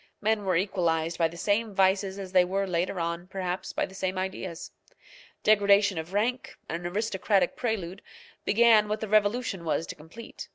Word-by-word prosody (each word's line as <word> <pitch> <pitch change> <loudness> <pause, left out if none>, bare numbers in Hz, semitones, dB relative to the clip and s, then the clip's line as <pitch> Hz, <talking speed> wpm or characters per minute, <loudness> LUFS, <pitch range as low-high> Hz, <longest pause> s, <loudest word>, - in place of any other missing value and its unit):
Men 215 -1 0
were 185 -2 +1
equalized 170 -3 0
by 165 - +4
the 170 +1 -11
same 205 +3 0
vices 190 0 +2
as 190 -2 -7
they 185 -1 +5
were 195 +2 -1
later 180 0 -1
on, 170 +1 -3
perhaps, 185 -1 -4
by - - -1
the - - -14
same 190 -1 -3
ideas. 185 -2 -5 0.7
Degradation 200 -3 +4
of 160 +2 -7
rank, 230 +6 -1
an 170 +1 -4
aristocratic 195 -1 0
prelude, 200 -6 -3 0.4
began 220 -1 +5
what 215 +1 -2
the 220 - -4
revolution 210 -2 +1
was 165 0 -1
to - - -6
complete. 160 +10 -11
190 Hz, 170 wpm, -27 LUFS, 175-210 Hz, 0.7 s, they